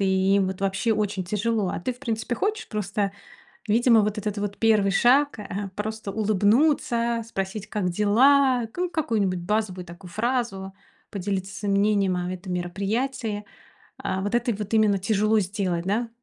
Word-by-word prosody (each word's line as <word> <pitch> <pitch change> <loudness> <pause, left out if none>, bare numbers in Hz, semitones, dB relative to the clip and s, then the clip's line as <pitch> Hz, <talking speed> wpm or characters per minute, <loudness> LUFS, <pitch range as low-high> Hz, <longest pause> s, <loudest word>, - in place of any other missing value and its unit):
и 195 - +2 0.3
им 195 - +2
вот, 190 0 -5
вообще, 195 +4 +1
очень 205 -3 -1
тяжело. 210 +1 0
А - - -3
ты, 255 - -2
в 245 - -17
принципе, 230 -2 -2
хочешь? 420 - -2
Просто, 205 -1 -2 0.5
видимо, 230 +1 +5
вот 210 +1 -1
этот 210 0 -3
вот 205 0 -4
1 215 -3 +3
шаг, 275 +6 +4
э, 200 -1 -5
просто 215 -1 -4
улыбнуться, 230 +3 +2
спросить: 200 -1 -4
"Как 205 -4 -1
дела?" 245 +6 +4
Ку 360 0 -1
какую-нибудь 215 - 0
базовую 185 0 -1
такую 175 +1 -12
фразу, 215 -4 -2 0.4
поделиться 195 0 -3
своим 200 -1 -1
мнением 200 -2 +2
о 180 0 -2
этом 185 0 -6
мероприятии, 205 +5 -2 0.6
э, 190 - -1
вот 205 +3 -3
это 240 0 +1
и 210 - -2
вот 210 +1 -6
именно 215 -2 +4
тяжело 215 +2 +2
сделать, 185 -3 -2
да? 225 +4 0
210 Hz, 165 wpm, -25 LUFS, 195-230 Hz, 0.6 s, видимо